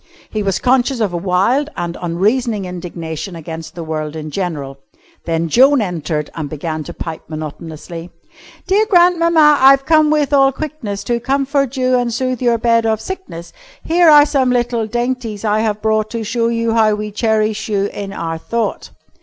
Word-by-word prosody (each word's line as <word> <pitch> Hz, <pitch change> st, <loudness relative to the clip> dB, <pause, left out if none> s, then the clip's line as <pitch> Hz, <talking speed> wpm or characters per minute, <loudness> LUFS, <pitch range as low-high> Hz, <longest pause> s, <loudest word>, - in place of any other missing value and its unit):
He 215 Hz, -, -2 dB
was 195 Hz, -2 st, 0 dB
conscious 255 Hz, +2 st, +1 dB
of 205 Hz, -5 st, 0 dB
a -, -, -1 dB
wild 195 Hz, -, +1 dB
and 175 Hz, 0 st, -3 dB
unreasoning 205 Hz, +5 st, 0 dB
indignation 175 Hz, -1 st, -6 dB
against 165 Hz, 0 st, -8 dB
the 170 Hz, -, -6 dB
world 155 Hz, -1 st, -4 dB
in 155 Hz, -1 st, -6 dB
general. 145 Hz, -7 st, -4 dB, 0.5 s
Then 165 Hz, 0 st, -1 dB
Joan 265 Hz, -, +5 dB
entered 165 Hz, -6 st, -3 dB
and 155 Hz, -3 st, -5 dB
began 155 Hz, +1 st, -4 dB
to -, -, -8 dB
pipe 160 Hz, -2 st, -6 dB
monotonously: 160 Hz, +2 st, -7 dB, 0.6 s
"Dear 410 Hz, +3 st, +2 dB
grandmamma, 335 Hz, -5 st, +4 dB
I've 270 Hz, +1 st, +6 dB
come 310 Hz, -1 st, +4 dB
with 295 Hz, -2 st, +1 dB
all 270 Hz, -1 st, +5 dB
quickness 270 Hz, -9 st, -5 dB
To 240 Hz, -1 st, -1 dB
comfort 275 Hz, +1 st, 0 dB
you 255 Hz, -1 st, +2 dB
and 240 Hz, -1 st, -1 dB
sooth 255 Hz, +1 st, -2 dB
your 240 Hz, -2 st, +2 dB
bed 230 Hz, 0 st, +2 dB
of 220 Hz, -1 st, +1 dB
sickness, 365 Hz, -, -8 dB, 0.3 s
Here 340 Hz, 0 st, +4 dB
are 295 Hz, -1 st, +8 dB
some 270 Hz, -4 st, +1 dB
little 240 Hz, -2 st, 0 dB
dainties 240 Hz, -2 st, -3 dB
I 210 Hz, 0 st, +2 dB
have 215 Hz, -1 st, -1 dB
brought 215 Hz, -1 st, +1 dB
To 230 Hz, -1 st, -4 dB
show 230 Hz, +2 st, 0 dB
you 230 Hz, -1 st, 0 dB
how 220 Hz, -2 st, +3 dB
we 210 Hz, 0 st, -5 dB
cherish 215 Hz, 0 st, 0 dB
you 200 Hz, -2 st, +1 dB
in 200 Hz, -1 st, -6 dB
our 165 Hz, -4 st, -4 dB
thought." 230 Hz, +7 st, -3 dB
220 Hz, 175 wpm, -17 LUFS, 175-260 Hz, 0.6 s, are